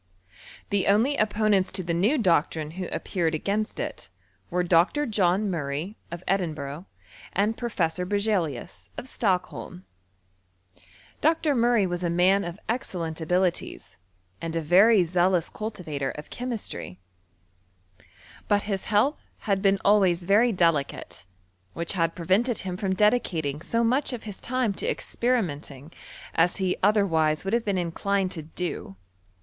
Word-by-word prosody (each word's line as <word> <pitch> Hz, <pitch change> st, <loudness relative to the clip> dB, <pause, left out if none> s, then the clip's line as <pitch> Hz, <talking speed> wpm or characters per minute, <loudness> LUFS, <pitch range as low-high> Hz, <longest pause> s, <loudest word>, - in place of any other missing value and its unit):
The 200 Hz, -2 st, +1 dB
only 225 Hz, +8 st, +3 dB
opponents 210 Hz, -3 st, +2 dB
to 185 Hz, -, -1 dB
the 170 Hz, 0 st, -2 dB
new 205 Hz, -, +2 dB
doctrine 160 Hz, -, +1 dB
who 180 Hz, +1 st, -5 dB
ap -, -, -4 dB
peared 165 Hz, -4 st, 0 dB
against 205 Hz, +7 st, -2 dB
it, -, -, -5 dB, 0.4 s
were 180 Hz, 0 st, 0 dB
Dr. 175 Hz, -, +3 dB
John 200 Hz, -3 st, +1 dB
Murray, 160 Hz, +2 st, -3 dB
of 170 Hz, +1 st, -7 dB
Edin 180 Hz, -5 st, 0 dB
buigh, 145 Hz, +4 st, -6 dB, 0.5 s
and 210 Hz, +3 st, +1 dB
Professor 185 Hz, -8 st, -1 dB
Berzelius, 190 Hz, -, -2 dB
of 255 Hz, -, -5 dB
Stockholm. 170 Hz, -, -2 dB, 1.4 s
Dr. 320 Hz, -1 st, +2 dB
Murray 235 Hz, -4 st, +3 dB
was 175 Hz, -1 st, -3 dB
a 175 Hz, -, +1 dB
man 185 Hz, +4 st, +3 dB
of 175 Hz, +2 st, -6 dB
excellent 175 Hz, -9 st, -3 dB
abilities, 180 Hz, +2 st, -1 dB, 0.4 s
and 165 Hz, 0 st, -4 dB
a 165 Hz, -, 0 dB
very 195 Hz, +5 st, +6 dB
zealous 175 Hz, 0 st, +1 dB
cultivator 165 Hz, -11 st, -4 dB
of 150 Hz, -, -8 dB
chemistry; 230 Hz, -, -5 dB, 1.5 s
but 205 Hz, 0 st, +2 dB
his 195 Hz, -2 st, -3 dB
health 220 Hz, +8 st, +2 dB, 0.2 s
had 195 Hz, -2 st, 0 dB
been 195 Hz, 0 st, +3 dB
always 190 Hz, -4 st, +4 dB
very 210 Hz, +6 st, +4 dB
delicate, 165 Hz, -, 0 dB, 0.5 s
which 170 Hz, +3 st, -3 dB
had 165 Hz, -3 st, 0 dB
prevented 195 Hz, +7 st, +1 dB
him 185 Hz, -1 st, -3 dB
from 190 Hz, 0 st, -1 dB
dedicating 170 Hz, -, +1 dB
so 230 Hz, +6 st, 0 dB
much 260 Hz, +4 st, +1 dB
of 240 Hz, -, -6 dB
his 205 Hz, -3 st, -7 dB
time 250 Hz, -4 st, 0 dB
to -, -, -4 dB
experiment 225 Hz, -, -1 dB
ing 140 Hz, +3 st, -12 dB, 0.4 s
as 170 Hz, +2 st, +3 dB
he 190 Hz, -2 st, 0 dB
otherwise 170 Hz, -6 st, +2 dB
would 195 Hz, -, -2 dB
have 235 Hz, 0 st, +2 dB
been 200 Hz, -2 st, 0 dB
inclined 185 Hz, +2 st, -1 dB
to 160 Hz, -, -3 dB
do. 160 Hz, -, -5 dB
185 Hz, 145 wpm, -26 LUFS, 165-215 Hz, 1.5 s, very